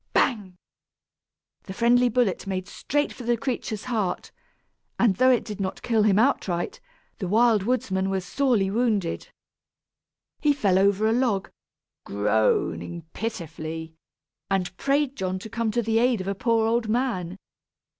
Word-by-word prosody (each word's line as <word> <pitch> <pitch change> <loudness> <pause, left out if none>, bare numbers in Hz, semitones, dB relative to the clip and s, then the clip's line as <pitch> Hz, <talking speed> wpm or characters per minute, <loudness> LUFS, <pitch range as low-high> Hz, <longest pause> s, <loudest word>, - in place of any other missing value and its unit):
Bang! 200 -8 +1 1.1
The 190 - -7
friendly 245 +3 +4
bullet 235 -6 0
made 185 -1 -3
straight 290 0 -2
for - - -11
the 240 0 +1
creature's 230 -4 -3
heart, 220 -7 -2 0.7
and 205 -6 +3
though 255 +3 +5
it 250 -2 +3
did 210 -2 -6
not 190 0 -4
kill 225 -2 +2
him 205 -2 +4
outright, 220 - 0 0.4
the 190 - -3
Wild 220 +2 +4
Woodsman 190 -4 0
was 190 -1 -2
sorely 215 -2 +1
wounded. 215 -6 0 1.1
He 295 -1 +3
fell 200 -9 +2
over 200 +2 +3
a 220 - +2
log, 230 -6 0 0.5
groaning 105 - 0
pitifully, 160 -6 -5 0.6
and 185 -3 -1
prayed 280 +3 0
John 185 -3 -2
to 210 +3 -9
come 230 0 -1
to 235 +2 0
the 225 +1 +2
aid 245 -2 +2
of 185 - -5
a 195 - 0
poor 225 +2 +1
old 230 0 0
man. 215 -7 -1
215 Hz, 145 wpm, -25 LUFS, 185-240 Hz, 1.1 s, though